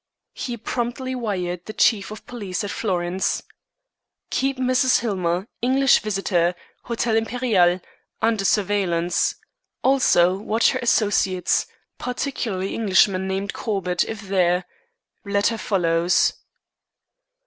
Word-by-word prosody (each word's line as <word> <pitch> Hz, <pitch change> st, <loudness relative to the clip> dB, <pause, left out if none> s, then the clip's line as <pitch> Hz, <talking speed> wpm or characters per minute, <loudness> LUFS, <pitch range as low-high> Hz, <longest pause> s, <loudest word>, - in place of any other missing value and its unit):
He 240 Hz, -2 st, -5 dB
promptly 245 Hz, +3 st, -3 dB
wired 180 Hz, -7 st, -3 dB
the 215 Hz, -, -6 dB
Chief 205 Hz, 0 st, +2 dB
of 215 Hz, 0 st, -10 dB
Police 205 Hz, -7 st, -4 dB
at 205 Hz, -, -4 dB
Florence: 185 Hz, -2 st, -1 dB, 0.9 s
"Keep 270 Hz, 0 st, 0 dB
Mrs. 255 Hz, 0 st, +3 dB
Hillmer, 185 Hz, -5 st, -1 dB, 0.2 s
English 265 Hz, +2 st, +4 dB
visitor, 190 Hz, -4 st, 0 dB, 0.3 s
Hotel 235 Hz, -1 st, 0 dB
Imperiale, 225 Hz, -6 st, +2 dB, 0.4 s
under 220 Hz, -2 st, +1 dB
surveillance. 185 Hz, -4 st, +1 dB, 0.5 s
Also 220 Hz, -9 st, +4 dB
watch 220 Hz, +2 st, +2 dB
her 260 Hz, -, -2 dB
associates, 205 Hz, -6 st, +1 dB, 0.3 s
particularly 235 Hz, -7 st, -3 dB
Englishman 190 Hz, -3 st, +2 dB
named 195 Hz, +1 st, -2 dB
Corbett, 185 Hz, -5 st, -1 dB
if 220 Hz, -1 st, -6 dB
there. 185 Hz, -2 st, +1 dB, 0.6 s
Letter 205 Hz, +2 st, 0 dB
follows." 175 Hz, -3 st, +2 dB
200 Hz, 105 wpm, -22 LUFS, 180-235 Hz, 0.9 s, English